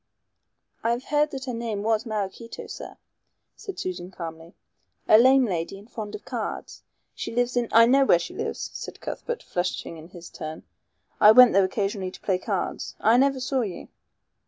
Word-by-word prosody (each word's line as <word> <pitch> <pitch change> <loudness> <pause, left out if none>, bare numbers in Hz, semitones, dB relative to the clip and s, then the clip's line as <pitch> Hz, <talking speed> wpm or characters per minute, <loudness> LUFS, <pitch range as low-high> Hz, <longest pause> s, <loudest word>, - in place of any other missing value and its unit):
"I 230 - +1
have 240 +2 -4
heard 295 +2 +1
that 270 -2 -6
her 250 - -4
name 230 -3 -3
was 220 +1 0
Maraquito, 215 +2 -5
sir," - - -9 0.6
said 400 -3 -8
Susan 180 -1 -5
calmly. 165 -2 -9 0.5
"A 215 - +8
lame 260 +2 +6
lady 180 -2 -3
and 200 +2 -14
fond 215 -4 -6
of - - -10
cards. - - -5 0.3
She - - -5
lives 245 0 +1
in 240 -1 +1
" - - -21
"I 230 +1 +7
know 270 +3 +5
where 220 - +5
she 170 - -6
lives," - - -4
said - - -8
Cuthbert, 475 -1 -5
flushing 175 -2 -3
in 160 +1 -11
his 175 -1 -12
turn. 155 0 -7 0.6
"I 210 - +9
went 250 +1 +8
there 195 - +5
occasionally 195 -1 -2
to - - -13
play 185 -2 0
cards. - - -3
I 225 - +4
never 275 +1 +3
saw 260 +1 0
you." 195 -7 -5
215 Hz, 185 wpm, -25 LUFS, 185-250 Hz, 0.6 s, I